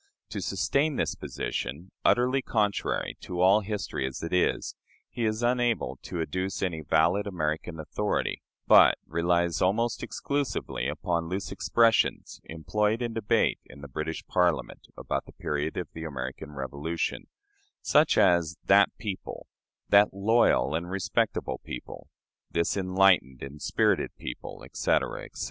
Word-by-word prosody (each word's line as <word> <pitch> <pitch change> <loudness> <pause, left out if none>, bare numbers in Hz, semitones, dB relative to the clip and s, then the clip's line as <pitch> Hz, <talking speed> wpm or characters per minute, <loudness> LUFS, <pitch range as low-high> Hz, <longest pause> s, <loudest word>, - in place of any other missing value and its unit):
To - - -4
sustain 145 +1 0
this - - 0
position 75 +8 -5
utterly 125 +2 +3
contrary 105 -5 -1
to 90 -1 -6
all 95 +4 +5
history 100 -10 -3
as 65 - -7
it 85 - -4
is 90 - +1 0.4
he 120 0 -2
is 110 +2 -1
unable 120 -2 +1
to 85 - -6
adduce 95 +5 -2
any 85 -4 -2
valid 85 +7 +2
American 80 -2 -3
authority, 80 - -2 0.2
but - - +7
relies 85 +1 +1
almost 115 +6 +1
exclusively 140 -1 -2
upon 85 -1 -2
loose 95 +2 -3
expressions 115 -1 +2
employed 105 +9 -1
in 120 -1 -3
debate 110 -2 +1
in 70 - -13
the 70 - -8
British 75 +4 -4
Parliament 90 -2 0
about - - -3
the - - -13
period 75 +1 -3
of 90 - -3
the 80 - -7
American 70 -1 -6
Revolution 70 +4 -3 0.6
such - - +4
as 85 -3 +3
"that - - +6
people," 100 -3 -6 0.4
"that 100 -1 +5
loyal 100 - +3
and 85 +2 -2
respectable 100 +4 -1
people," 60 - -8 0.4
"this 85 0 0
enlightened 95 -9 +3
and 70 +2 -9
spirited - - +1
people," - - -7
etc., - - -1
etc. - - -12
90 Hz, 135 wpm, -28 LUFS, 80-105 Hz, 0.6 s, but